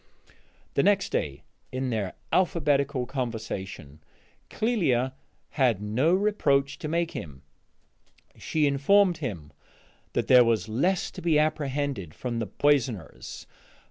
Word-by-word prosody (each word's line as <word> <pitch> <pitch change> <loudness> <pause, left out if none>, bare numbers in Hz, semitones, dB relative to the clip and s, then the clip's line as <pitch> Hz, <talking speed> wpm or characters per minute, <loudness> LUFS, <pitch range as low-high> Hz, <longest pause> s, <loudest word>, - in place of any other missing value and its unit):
The - - +3
next 200 -1 +2
day, 70 -1 -2 0.3
in 130 0 -2
their 105 -5 -2 0.2
alphabetical 145 -7 +2
conversation, 110 - -5 0.5
Clélia 135 - +1 0.4
had 125 -8 +2
no 110 +10 +1
reproach 145 -9 +1
to - - -4
make 170 +1 0
him. 70 -5 -8 0.9
She 155 -2 0
informed 175 +7 +4
him 85 - -6 0.6
that - - 0
there 125 -1 +8
was 115 -2 +1
less 175 - 0
to - - -9
be 165 -2 +3
apprehended 145 - -1
from 120 -2 -3
the 115 - -2
poisoners. 125 - -1
135 Hz, 115 wpm, -27 LUFS, 110-155 Hz, 0.9 s, there